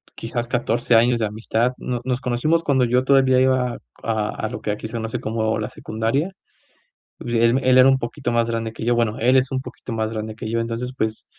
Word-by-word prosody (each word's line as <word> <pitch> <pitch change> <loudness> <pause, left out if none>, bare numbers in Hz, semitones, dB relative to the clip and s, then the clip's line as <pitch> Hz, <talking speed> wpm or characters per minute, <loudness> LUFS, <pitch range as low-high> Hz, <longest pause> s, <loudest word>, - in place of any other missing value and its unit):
quizás 120 +1 -4
14 120 0 +1
años 120 +1 +4
de 110 - +1
amistad. 110 +3 -1
No 125 -2 -3
nos 130 0 -1
conocimos 140 +8 +1
cuando 130 -4 +2
yo 125 +2 +2
todavía 130 -1 +4
iba 130 -2 +1 0.2
a 110 -2 -1 0.2
a - - -2
lo - - -6
que 105 - -2
aquí 105 +1 -4
se 110 - -12
conoce 115 -1 -3
como 110 0 -1
la 105 - -3
secundaria. 115 - -2 0.9
Y - - -9
pues 120 -1 -1
él 115 +3 +3
él 130 0 +5
era 130 - +8
un 135 0 +4
poquito 130 +2 -4
más 115 0 +2
grande 115 -1 -2
que 115 - -7
yo, 120 - +2
bueno, 115 -2 +1
él 125 +3 +4
es 130 0 +2
un 130 - 0
poquito 125 -2 -9
más 110 0 -2
grande 110 0 -4
que 110 0 -6
yo, 115 - 0
entonces, 115 +2 -3
pues, 110 0 -2
120 Hz, 230 wpm, -22 LUFS, 110-130 Hz, 0.9 s, era